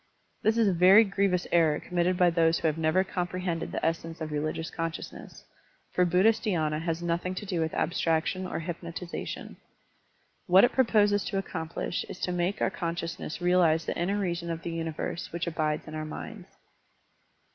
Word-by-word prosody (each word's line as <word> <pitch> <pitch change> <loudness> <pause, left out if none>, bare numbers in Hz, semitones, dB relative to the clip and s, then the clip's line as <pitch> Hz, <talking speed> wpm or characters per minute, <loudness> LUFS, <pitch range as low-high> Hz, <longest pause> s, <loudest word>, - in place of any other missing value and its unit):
This 220 +1 +2
is 225 -2 +4
a 195 - +3
very 185 +5 +7
grievous 195 -3 0
error 160 -3 +3
committed 180 0 0
by 180 -1 +4
those 165 -1 +3
who - - -5
have 155 - +1
never 160 +4 +3
comprehended 180 -2 -3
the - - -2
essence 165 0 -2
of 155 -1 -5
religious 155 +2 -2
con 165 0 -2
sciousness, - - -10 0.5
for 180 - +3
Buddhist 195 +6 +3
dhy^na 155 -7 0
has 165 0 -2
nothing 170 +2 -1
to 205 - -5
do 185 -3 -2
with 160 0 -1
abstraction 165 +2 0
or 165 - -4
hypnotization. 170 +1 -6 0.9
What 185 +1 +7
it 245 - +5
proposes 205 -5 +3
to 195 - -2
accomplish 170 -2 -3
is - - -8
to 180 - -1
make 180 +3 -1
our - - +1
conscious 170 -1 -4
ness 165 - -6
realize 175 -2 +3
the - - -2
inner 190 +4 0
reason 175 -3 -2
of 165 0 -4
the 170 - -3
universe 165 +1 -4
which 170 +1 -3
abides 155 -2 -1
in 155 - -8
our 155 0 -3
minds. 155 - -8
170 Hz, 180 wpm, -28 LUFS, 165-185 Hz, 0.9 s, very